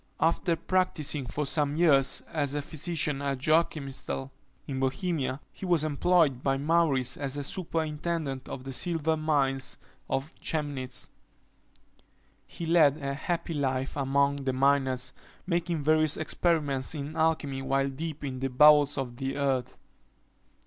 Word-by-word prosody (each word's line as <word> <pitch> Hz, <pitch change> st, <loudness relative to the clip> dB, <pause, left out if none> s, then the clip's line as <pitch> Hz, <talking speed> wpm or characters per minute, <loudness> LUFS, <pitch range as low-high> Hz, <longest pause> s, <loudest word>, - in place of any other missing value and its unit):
After 165 Hz, +1 st, +2 dB
practising 160 Hz, -7 st, -1 dB
for 150 Hz, +4 st, -2 dB
some 145 Hz, 0 st, +1 dB
years 140 Hz, -5 st, +3 dB
as 145 Hz, -3 st, 0 dB
a 145 Hz, -, 0 dB
physician 155 Hz, -2 st, -2 dB
at 140 Hz, -1 st, -1 dB
Joachimsthal, 140 Hz, -2 st, 0 dB, 0.3 s
in 135 Hz, -2 st, -4 dB
Bohemia, 135 Hz, 0 st, -1 dB
he -, -, -13 dB
was 175 Hz, -4 st, +2 dB
employed 155 Hz, -3 st, +2 dB
by 135 Hz, 0 st, +1 dB
Maurice 140 Hz, -4 st, +2 dB
as 140 Hz, -2 st, -3 dB
superintendent 160 Hz, -4 st, -2 dB
of 130 Hz, -, -6 dB
the 135 Hz, 0 st, -6 dB
silver 160 Hz, +1 st, 0 dB
mines 140 Hz, -3 st, 0 dB, 0.3 s
of 135 Hz, +4 st, -2 dB
Chemnitz. 145 Hz, -5 st, -3 dB, 1.4 s
He 170 Hz, -, -7 dB
led 160 Hz, -4 st, +5 dB
a 140 Hz, -2 st, -3 dB
happy 170 Hz, +3 st, -3 dB
life 135 Hz, -2 st, -1 dB
among 140 Hz, 0 st, +2 dB
the 135 Hz, -2 st, -2 dB
miners, 130 Hz, -1 st, +2 dB, 0.3 s
making 170 Hz, -3 st, -1 dB
various 155 Hz, 0 st, +3 dB
experiments 155 Hz, -4 st, 0 dB
in 145 Hz, +2 st, -5 dB
alchymy 160 Hz, -4 st, 0 dB
while 135 Hz, +1 st, +1 dB
deep 155 Hz, +2 st, -6 dB
in 130 Hz, -2 st, -4 dB
the 135 Hz, +1 st, -1 dB
bowels 145 Hz, +2 st, +6 dB
of 125 Hz, -3 st, -4 dB
the 135 Hz, +1 st, -3 dB
earth. 135 Hz, -3 st, -1 dB
145 Hz, 135 wpm, -28 LUFS, 135-160 Hz, 1.4 s, bowels